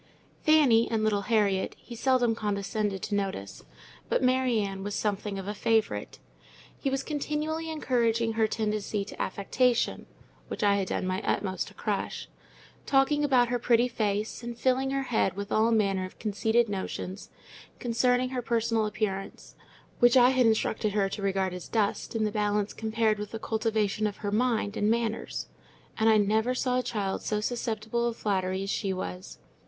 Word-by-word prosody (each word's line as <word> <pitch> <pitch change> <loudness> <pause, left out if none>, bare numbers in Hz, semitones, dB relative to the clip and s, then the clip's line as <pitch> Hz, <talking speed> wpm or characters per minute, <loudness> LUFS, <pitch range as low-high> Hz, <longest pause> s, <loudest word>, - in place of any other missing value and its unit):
Fanny 285 -8 +5
and 225 -2 0
little 210 -2 +2
Harriet 200 -4 +1
he 240 - -12
seldom 245 -1 +2
condescended 205 -2 -2
to 210 - -3
notice; 190 - -3 0.5
but - - +1
Mary 255 -2 +3
Ann 195 -2 -3
was 205 0 -3
something 205 -1 -2
of 195 0 -6
a 205 - -2
favourite. 220 0 0 0.6
He 275 - 0
was 270 0 -1
continually 305 +2 -2
encouraging 235 -7 +1
her 220 0 +2
tendency 210 -2 -2
to - - -7
affectation 235 +5 0 0.4
(which - - -4
I 200 -1 +4
had 195 -2 -1
done - - -2
my 185 +1 -1
utmost 190 -2 -1
to - - -13
crush), - - -3 0.6
talking 285 +2 +3
about 255 -4 +4
her 245 0 0
pretty 240 +1 +3
face, 215 -2 -2
and 235 0 -6
filling 260 +1 +1
her 275 0 -1
head 220 -7 0
with 200 +1 -5
all 220 +1 +3
manner 200 -4 +2
of 185 - -8
conceited 220 +2 +1
notions 195 -1 -5 0.5
concerning 250 +1 +1
her 255 -1 -2
personal 230 -2 +1
appearance 195 -2 -4 0.5
(which 240 +1 +6
I 250 0 +7
had 255 -2 +4
instructed 220 -1 +1
her 200 -2 +1
to 200 - -5
regard 190 -1 0
as 180 -1 -7
dust 215 0 -1
in 220 - +1
the 210 - 0
balance 210 -1 0
compared 220 -1 0
with 210 0 -5
the 225 - -5
cultivation 215 -1 0
of 205 - -5
her 200 - 0
mind 220 -2 +1
and 205 -1 +1
manners); 230 -1 -1 0.5
and 220 0 +3
I 220 - +6
never 220 +4 +2
saw 255 0 +1
a - - -2
child 200 -5 -2
so 210 - -1
susceptible 230 0 -2
of 235 - -3
flattery 190 -2 -1
as 195 - -2
she 195 -3 -1
was. 185 0 -6
220 Hz, 175 wpm, -28 LUFS, 200-240 Hz, 0.6 s, I